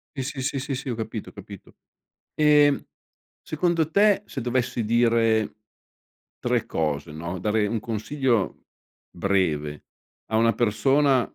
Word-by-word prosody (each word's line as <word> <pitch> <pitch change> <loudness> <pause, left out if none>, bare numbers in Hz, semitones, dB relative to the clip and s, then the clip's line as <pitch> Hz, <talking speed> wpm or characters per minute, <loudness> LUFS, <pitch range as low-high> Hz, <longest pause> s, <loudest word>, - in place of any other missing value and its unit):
Sì, 135 0 -4
sì, 135 +1 -1
sì, 135 +2 -4
sì 130 - -5
ho 120 - -2
capito, 110 -1 -5
ho - - -14
capito. 100 -1 -12 0.6
E 150 -2 +4 0.6
secondo 160 0 0
te 205 +2 +4
se 135 - -6
dovessi 125 -1 -1
dire 115 -1 +2 0.8
tre - - 0
cose 75 -2 -2
no, 85 +4 -5
dare 105 +2 +1
un 115 +2 -1
consiglio 115 0 -1 0.4
breve 80 -6 -1 0.4
a 110 - 0
una 115 0 +4
persona, 130 +5 +3
115 Hz, 125 wpm, -24 LUFS, 105-135 Hz, 0.8 s, E